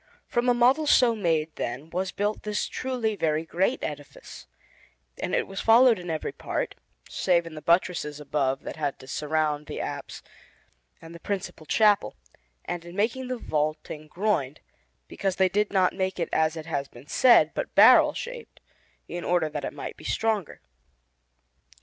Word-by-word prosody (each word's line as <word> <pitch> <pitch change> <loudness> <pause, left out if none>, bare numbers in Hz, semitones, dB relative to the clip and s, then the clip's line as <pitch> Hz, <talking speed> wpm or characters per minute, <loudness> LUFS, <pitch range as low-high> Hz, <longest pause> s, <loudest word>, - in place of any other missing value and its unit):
From 240 +1 0
a 245 - +4
model 260 +6 +3
so 245 -4 +5
made, 165 -6 -1
then, 135 +7 -5
was 185 +1 -2
built 205 +1 -2
this 210 -1 -2
truly 245 -4 -2
very 160 -3 0
great 190 +10 0
edifice, 145 - -8 0.7
and - - -1
it - - +1
was 195 0 -6
followed 230 -1 +6
in 175 -1 -8
every 160 -1 -3
part, - - -3 0.3
save 170 -2 +1
in 165 - -9
the 155 - -8
buttresses 170 -2 +1
above 140 -2 -1
that - - -7
had 145 -3 -2
to 130 - -14
surround 150 +1 -1
the - - -5
apse - - -6 0.8
and 165 +1 -11
the 170 - -10
principal 180 -5 -5
chapel, 205 - +3 0.5
and 175 -1 -4
in 175 +1 -11
making 235 +6 -1
the 255 0 -3
vaulting 155 -3 -3
groined, 165 -6 -1 0.5
because 195 -2 -2
they 190 -1 +3
did 205 +3 0
not 190 -2 +3
make 190 -1 -2
it 170 - -1
as 160 0 +2
has 155 -3 -4
been 120 +1 -15
said, 245 - +5
but - - -4
barrel - - +7
shaped, 480 -1 -8 0.5
in 175 0 -5
order 175 -3 +1
that 150 -1 -5
it - - -4
might - - -7
be - - -14
stronger. 220 -5 -1
175 Hz, 170 wpm, -26 LUFS, 155-210 Hz, 0.8 s, barrel